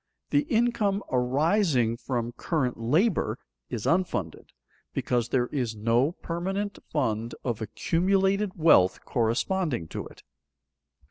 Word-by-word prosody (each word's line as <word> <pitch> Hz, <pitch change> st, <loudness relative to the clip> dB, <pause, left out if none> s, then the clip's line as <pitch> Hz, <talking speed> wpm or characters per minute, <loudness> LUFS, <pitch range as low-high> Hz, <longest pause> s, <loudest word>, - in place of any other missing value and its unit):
The 290 Hz, 0 st, +2 dB
income 220 Hz, -4 st, +1 dB
arising 130 Hz, -, +2 dB
from 120 Hz, -1 st, -3 dB
current 130 Hz, -1 st, -1 dB
labor 160 Hz, -, +1 dB, 0.3 s
is 110 Hz, -, -4 dB
unfunded, 165 Hz, -, -1 dB, 0.5 s
because 120 Hz, -1 st, 0 dB
there 125 Hz, -2 st, +2 dB
is 125 Hz, -6 st, -2 dB
no 115 Hz, +8 st, +2 dB
permanent 195 Hz, +5 st, -3 dB
fund 115 Hz, -6 st, -1 dB
of 120 Hz, -3 st, -2 dB
accumulated 190 Hz, -, +1 dB
wealth 125 Hz, -, +4 dB
corresponding 120 Hz, -, 0 dB
to -, -, -5 dB
it. -, -, -17 dB
140 Hz, 110 wpm, -27 LUFS, 115-190 Hz, 0.5 s, wealth